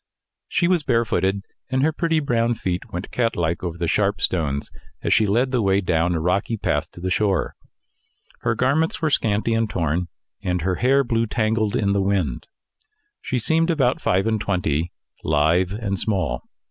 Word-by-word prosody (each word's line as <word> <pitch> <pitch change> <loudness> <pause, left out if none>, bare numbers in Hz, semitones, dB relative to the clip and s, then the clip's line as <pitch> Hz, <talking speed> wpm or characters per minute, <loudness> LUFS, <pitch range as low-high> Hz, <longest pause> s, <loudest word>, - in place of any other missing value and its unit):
She 175 - +1
was 180 -2 +3
barefooted, 115 -7 +1 0.3
and 130 +1 +1
her 160 - +3
pretty 165 0 +1
brown 120 -4 +1
feet 90 -4 -3
went 90 +2 -5
catlike 85 -9 0
over 85 -2 -3
the 85 0 -1
sharp 100 +4 +1
stones, 70 -6 -1 0.3
as - - +2
she 110 - +3
led 120 +6 +2
the 125 -3 +1
way 95 -1 +3
down 85 -2 +1
a - - 0
rocky 95 +7 0
path - - -1
to - - -11
the 95 +1 -3
shore. 100 -3 +1 0.9
Her 115 -1 0
garments 140 +7 +1
were 155 -2 0
scanty 110 -2 +1
and 115 -1 +1
torn, 85 0 -1 0.3
and 90 -3 -1
her 90 0 0
hair 135 +3 +3
blew 115 -2 0
tangled 110 -1 0
in 100 -2 +1
the 100 0 +2
wind. 95 -9 -1 0.7
She 130 - -2
seemed 160 +8 +2
about 135 -7 +1
five 95 +2 +2
and 110 -2 0
twenty, 85 -5 -1 0.3
lithe 80 +5 +2
and 100 -2 -2
small. 95 -8 -1
100 Hz, 175 wpm, -22 LUFS, 90-120 Hz, 0.9 s, was